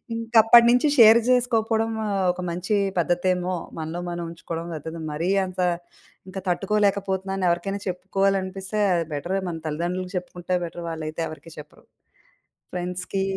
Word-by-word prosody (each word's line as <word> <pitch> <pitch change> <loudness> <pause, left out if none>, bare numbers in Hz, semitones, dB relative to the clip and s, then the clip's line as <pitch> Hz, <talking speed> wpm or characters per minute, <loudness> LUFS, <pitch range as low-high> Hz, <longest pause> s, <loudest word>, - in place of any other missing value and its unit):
ఇంకప్పటినుంచి 235 +3 +5
share 225 -1 +9
జేసుకోకపోవడము 225 -3 +1 0.3
ఒక 180 - -7
మంచి 180 +5 -1 0.2
పద్ధతేమో 180 +1 0 0.3
మనలో 160 +2 -4
మనం 175 0 -4
ఉంచుకోవడం 165 0 -6
లేకపోతే 160 +2 -7
మరీ 165 +4 -2 0.2
అంత, 185 0 -9 0.7
ఇంకా 190 0 -6
తట్టుకోలేకపోతున్నానని 195 -1 0
ఎవరికైనా 195 +4 -1
చెప్పుకోవాలనిపిస్తే 190 +2 -1
అది 170 -1 0
బెటరె 175 +7 -2
మన 165 -1 -5
తల్లిదండ్రులకి 180 +4 -3
చెప్పుకుంటే 180 0 -3
బెటర్ 170 +1 -8
వాళ్ళైతే 160 0 -4
ఎవరికీ 160 +1 -11
చెప్పరు. 150 - -14 0.9
ఫ్రెండ్స్‌కి, 180 +2 -3
185 Hz, 115 wpm, -24 LUFS, 170-200 Hz, 0.9 s, share